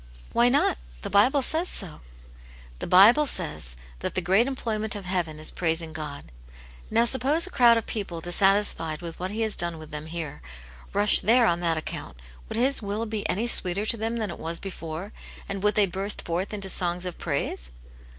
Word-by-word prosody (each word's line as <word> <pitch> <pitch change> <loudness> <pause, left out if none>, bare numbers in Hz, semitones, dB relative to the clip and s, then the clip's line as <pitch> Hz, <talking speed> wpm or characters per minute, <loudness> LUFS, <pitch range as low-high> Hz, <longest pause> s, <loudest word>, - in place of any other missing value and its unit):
" - - -22
Why 240 +1 +4
not? 265 - +1 0.2
The - - -5
Bible 260 +7 +4
says 325 +7 +2
so." 180 -7 -2 0.8
"The - - -5
Bible 230 +11 +6
says 150 - -3 0.2
that - - -5
the - - +2
great 190 +7 +2
employment 220 -5 -3
of 200 -2 -7
heaven 175 -4 -2
is 155 0 -1
praising 165 -1 -2
God. 150 - -7 0.6
Now, 230 +1 +2
suppose 270 +6 +2
a 375 - -6
crowd 235 -5 +5
of 230 - -3
people 195 -6 -5
dissatisfied 175 -2 +1
with 165 -1 -8
what 185 +1 -3
H^V^^ 205 - -7
^^^^ - - -5
^\K^ 225 - +1
"^^ - - 0
^ss. 215 - -1
202 175 - +3 0.2
Aunt - - -18
Janets - - -11
Hero. 165 -3 -4
here, - - -16 0.5
rush 205 0 +9
there 235 +5 +4
on 170 -5 +1
that 165 -2 0
account, 155 - -6 0.3
would - - -5
His 260 +3 +1
will 210 +2 -3
be 215 -2 -4
any 215 +5 0
sweeter 200 -3 +1
to 225 - +2
them 225 +2 -3
than 215 -5 -3
it - - -9
was 165 +1 -3
before, 180 +1 -7 0.3
and 195 -1 -4
would 210 +1 +1
they 210 - +4
burst 195 +2 -2
forth 175 +3 -3
into 200 -2 -2
songs 180 -1 0
of 180 - -6
praise 140 - -3
195 Hz, 210 wpm, -25 LUFS, 170-225 Hz, 0.8 s, rush